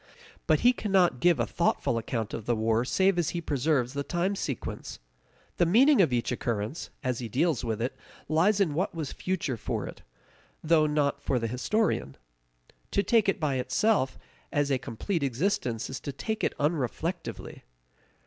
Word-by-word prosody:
But -, -, +3 dB
he 245 Hz, +1 st, +6 dB
cannot 190 Hz, -, +2 dB
give 170 Hz, 0 st, +4 dB
a 115 Hz, -, +2 dB
thoughtful 115 Hz, -, 0 dB
account 115 Hz, -1 st, -3 dB
of 110 Hz, -, -5 dB
the 120 Hz, -, +2 dB
war 110 Hz, +1 st, +1 dB
save 190 Hz, +8 st, +2 dB
as 170 Hz, -, +1 dB
he -, -, 0 dB
preserves 140 Hz, -4 st, 0 dB
the 140 Hz, -, -2 dB
time 180 Hz, +6 st, -1 dB
sequence; 140 Hz, -, -5 dB, 0.6 s
the 175 Hz, -, +4 dB
meaning 255 Hz, -, +6 dB
of 165 Hz, -, +3 dB
each 120 Hz, -1 st, 0 dB
occurrence, 115 Hz, +3 st, -3 dB
as 125 Hz, -3 st, -1 dB
he 120 Hz, -3 st, -5 dB
deals 140 Hz, +1 st, +1 dB
with 110 Hz, -3 st, -2 dB
it, 120 Hz, +3 st, -2 dB, 0.3 s
lies 185 Hz, +7 st, +3 dB
in 180 Hz, -7 st, +2 dB
what 180 Hz, +4 st, -1 dB
was 155 Hz, -4 st, -4 dB
future 170 Hz, -9 st, -2 dB
for -, -, -3 dB
it, -, -, -9 dB, 0.6 s
though 155 Hz, -1 st, +4 dB
not 150 Hz, -1 st, 0 dB
for 130 Hz, -, 0 dB
the 115 Hz, -, -1 dB
historian. 125 Hz, -, 0 dB, 0.7 s
To 200 Hz, -, +1 dB
take 225 Hz, -3 st, +3 dB
it 195 Hz, -, 0 dB
by 145 Hz, -5 st, 0 dB
itself 165 Hz, -, +1 dB, 0.3 s
as 145 Hz, -1 st, +1 dB
a 130 Hz, -, +2 dB
complete 165 Hz, -, -3 dB
existence 130 Hz, -, -1 dB
is 130 Hz, -, -5 dB
to 140 Hz, -, -5 dB
take 220 Hz, -, -4 dB
it -, -, +1 dB
unreflectively. 160 Hz, +4 st, -2 dB
145 Hz, 175 wpm, -28 LUFS, 125-180 Hz, 0.7 s, he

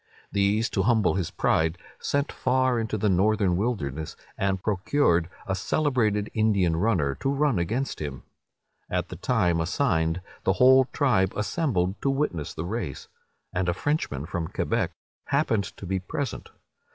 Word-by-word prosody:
These, 100 Hz, +3 st, +2 dB
to 95 Hz, -, +1 dB
humble 110 Hz, +1 st, +3 dB
his 95 Hz, -4 st, -1 dB
pride, 80 Hz, +1 st, +1 dB, 0.2 s
sent 140 Hz, +1 st, -1 dB
far 130 Hz, -1 st, +1 dB
into 110 Hz, -1 st, -2 dB
the 105 Hz, -, +1 dB
northern 100 Hz, 0 st, +3 dB
wilderness, 80 Hz, -, -2 dB, 0.2 s
and 95 Hz, -1 st, 0 dB
procured 95 Hz, -, +2 dB, 0.2 s
a 95 Hz, -, -1 dB
celebrated 110 Hz, -2 st, 0 dB
Indian 100 Hz, -6 st, +2 dB
runner, 85 Hz, -7 st, +1 dB
to 135 Hz, -, 0 dB
run 140 Hz, -6 st, +2 dB
against 115 Hz, +9 st, -2 dB
him. 70 Hz, -4 st, -5 dB, 0.7 s
At -, -, -1 dB
the -, -, -6 dB
time 85 Hz, -2 st, +1 dB
assigned, 80 Hz, -3 st, +1 dB, 0.2 s
the 95 Hz, -, +3 dB
whole 130 Hz, +4 st, +6 dB
tribe 120 Hz, -10 st, +1 dB
assembled 105 Hz, -, -1 dB
to 140 Hz, -, +1 dB
witness 135 Hz, -, -1 dB
the 80 Hz, -, -4 dB
race; 95 Hz, -, -4 dB, 0.4 s
and 90 Hz, -1 st, 0 dB
a 85 Hz, -, 0 dB
Frenchman, 95 Hz, -, -1 dB
from 85 Hz, 0 st, -3 dB
Quebec, -, -, -1 dB, 0.4 s
happened 115 Hz, -8 st, +1 dB
to -, -, -8 dB
be 95 Hz, +1 st, -1 dB
present. 125 Hz, +8 st, -4 dB
100 Hz, 150 wpm, -26 LUFS, 90-125 Hz, 0.7 s, whole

